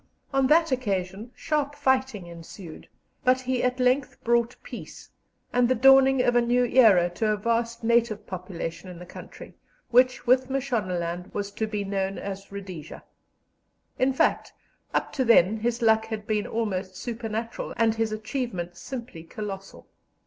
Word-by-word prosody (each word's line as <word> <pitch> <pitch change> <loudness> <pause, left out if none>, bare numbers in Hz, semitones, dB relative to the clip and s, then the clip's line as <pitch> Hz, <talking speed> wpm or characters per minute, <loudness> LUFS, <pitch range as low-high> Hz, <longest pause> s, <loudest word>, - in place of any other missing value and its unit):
On 270 -1 +3
that 325 +2 +4
occasion 200 -3 -2
sharp 290 -1 -1
fighting 265 -8 0
ensued, 170 0 -11 0.4
but 255 0 +3
he 255 -1 -1
at 250 0 0
length 255 +2 +1
brought 235 +1 +2
peace, - - -10 0.4
and 245 0 +3
the 255 - +3
dawning 270 +1 +6
of 245 - +2
a 240 - +5
new 245 +1 +2
era 220 -8 +5
to 215 +5 -1
a 215 0 +1
vast 230 +2 -1
native 230 -2 +2
population 180 -1 -6
in 180 - -9
the 180 - -10
country, - - -11 0.4
which, 250 +1 +4
with 255 +1 +3
Mashonaland, 185 -10 -2
was 205 -1 -3
to 220 +2 -2
be 210 -1 -3
known 195 -1 -2
as 195 0 -7
Rhodesia. 185 -6 -8 1.0
In 260 +1 +3
fact, 265 - +1 0.4
up - - -1
to 265 - +1
then 220 -3 +5
his 235 +2 -1
luck 220 0 +4
had 220 -2 -5
been 210 -1 -1
almost 195 -4 -3
supernatural 230 0 -4
and 225 -1 +3
his 225 -1 -1
achievements 215 -6 -4
simply 235 -3 -7
colossal. 195 +2 -8
225 Hz, 155 wpm, -26 LUFS, 195-250 Hz, 1.0 s, dawning